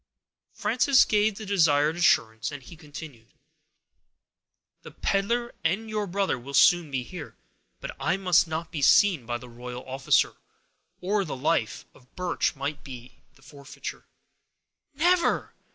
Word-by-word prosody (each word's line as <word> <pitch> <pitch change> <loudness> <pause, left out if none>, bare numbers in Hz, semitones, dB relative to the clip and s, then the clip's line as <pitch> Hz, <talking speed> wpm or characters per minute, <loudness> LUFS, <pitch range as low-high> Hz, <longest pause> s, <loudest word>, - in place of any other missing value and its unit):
Frances 260 +2 +3
gave 210 0 +2
the 215 - -7
desired 160 -6 +3
assurance, 110 -10 +2
and 145 -2 -8
he 165 - -12
continued,— 145 -7 -12 1.5
"The - - -11
peddler 235 +5 -1
and 220 +4 -1
your 210 -1 -2
brother 195 -6 -1
will 140 +3 -7
soon 175 0 +5
be 135 -2 -2
here, 160 +3 -9 0.4
but - - -7
I - - 0
must 180 -3 +3
not 160 +1 -4
be 155 -4 -4
seen 165 - +4
by 120 0 -2
the 125 - -12
royal 125 +1 -9
officer, 135 +1 +1 0.6
or 200 +2 0
the 155 -6 -5
life 125 -5 -1
of 125 - -23
Birch 180 -3 -1
might 145 +2 -5
be 125 -2 -11 0.2
the - - -23
forfeiture." 140 -2 -9 0.9
"Never!" 350 +4 +2
160 Hz, 140 wpm, -26 LUFS, 135-195 Hz, 1.5 s, soon